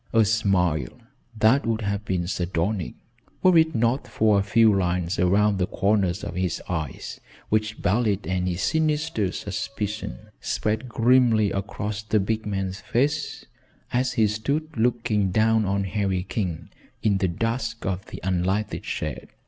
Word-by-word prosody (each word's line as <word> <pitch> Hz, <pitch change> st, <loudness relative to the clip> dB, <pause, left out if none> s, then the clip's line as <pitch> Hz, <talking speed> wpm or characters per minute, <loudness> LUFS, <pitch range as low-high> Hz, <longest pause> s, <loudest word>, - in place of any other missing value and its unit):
A 115 Hz, -1 st, +5 dB
smile 95 Hz, -, +1 dB, 0.4 s
that 115 Hz, +5 st, +4 dB
would 115 Hz, -1 st, 0 dB
have 100 Hz, 0 st, -2 dB
been 90 Hz, -3 st, -1 dB
sardonic, 90 Hz, +2 st, -2 dB, 0.5 s
were 185 Hz, -1 st, +6 dB
it 160 Hz, -2 st, +4 dB
not 120 Hz, +3 st, +1 dB
for 110 Hz, -3 st, +3 dB
a -, -, +2 dB
few 110 Hz, +2 st, +4 dB
lines 90 Hz, -2 st, 0 dB
around 100 Hz, +2 st, +3 dB
the 90 Hz, -, +1 dB
corners 100 Hz, -2 st, +1 dB
of -, -, -4 dB
his 90 Hz, -1 st, -1 dB
eyes 80 Hz, -7 st, -4 dB, 0.3 s
which 110 Hz, 0 st, -1 dB
belied 105 Hz, 0 st, +1 dB
any 90 Hz, -1 st, -1 dB
sinister 150 Hz, -, 0 dB
suspicion, 105 Hz, +1 st, -4 dB, 0.2 s
spread 110 Hz, +4 st, -2 dB
grimly 115 Hz, -3 st, +4 dB
across 105 Hz, +2 st, -3 dB
the 110 Hz, 0 st, +1 dB
big 110 Hz, +2 st, -1 dB
man's 95 Hz, -1 st, -2 dB
face 145 Hz, +5 st, -1 dB, 0.5 s
as 125 Hz, +1 st, +1 dB
he 110 Hz, -3 st, +3 dB
stood 140 Hz, +10 st, -2 dB
looking 110 Hz, -4 st, +1 dB
down 110 Hz, +3 st, +3 dB
on 100 Hz, 0 st, 0 dB
Harry 95 Hz, -1 st, -1 dB
King 90 Hz, -4 st, -3 dB, 0.3 s
in 100 Hz, -3 st, +2 dB
the 95 Hz, -, +2 dB
dusk 115 Hz, +5 st, -2 dB
of 95 Hz, 0 st, -3 dB
the -, -, -8 dB
unlighted 95 Hz, +3 st, -1 dB
shed. -, -, -4 dB
105 Hz, 145 wpm, -25 LUFS, 95-115 Hz, 0.5 s, were